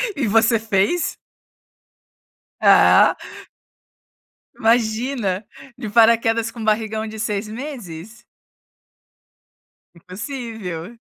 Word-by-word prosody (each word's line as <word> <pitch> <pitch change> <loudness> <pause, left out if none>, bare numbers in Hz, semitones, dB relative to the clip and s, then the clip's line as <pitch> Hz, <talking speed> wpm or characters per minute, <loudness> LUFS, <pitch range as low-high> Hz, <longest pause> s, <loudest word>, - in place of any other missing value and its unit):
E, 265 -6 -1
você 225 +1 +3
fez? 220 - 0 1.5
Ah. - - +6 1.4
Imagina. 225 -3 0 0.3
De 230 -5 -6
paraquedas 230 0 +3
com 235 - -12
um - - -5
barrigão 220 0 -1
de 220 0 -8
6 210 -1 -2
meses. 220 - -9 1.7
Impossível. 210 - -7
220 Hz, 75 wpm, -20 LUFS, 210-235 Hz, 1.7 s, Ah